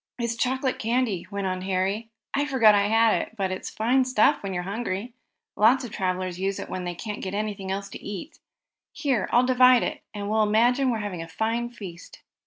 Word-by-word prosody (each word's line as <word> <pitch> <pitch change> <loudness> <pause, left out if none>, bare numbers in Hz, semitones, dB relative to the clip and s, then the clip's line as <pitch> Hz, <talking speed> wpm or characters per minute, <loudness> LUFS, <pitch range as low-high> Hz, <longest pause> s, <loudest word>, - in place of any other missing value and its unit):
"It's 235 -1 -2
chocolate 260 +2 -1
candy," 230 -6 0
went 200 -1 -3
on 185 -1 -2
Harry. 195 +4 -1 0.2
"I 285 +1 +1
forgot 235 -7 +5
I 200 0 +3
had 225 +1 +4
it, - - -8
but 190 -2 -1
it's 185 - -4
fine 250 +4 +2
stuff 255 +3 +3
when 195 - -4
you're 180 -1 -2
hungry. 205 +3 -4 0.4
Lots 245 +6 +4
of 240 - -7
travelers 185 -2 -2
use 195 +1 -1
it - - -6
when 185 -1 -4
they 175 0 -4
can't 210 +3 -6
get 190 +1 -4
anything 205 -2 -3
else 195 +1 -3
to - - -10
eat. 205 - -7 0.5
Here, 265 - 0
I'll 245 +1 +4
divide 255 -1 +6
it, - - -3
and 205 -1 -5
we'll 215 +1 +2
imagine 240 +5 +3
we're 235 - 0
having 205 -5 -4
a 165 - -7
fine 225 +6 -1
feast." 190 -7 -11
215 Hz, 205 wpm, -25 LUFS, 190-240 Hz, 0.5 s, divide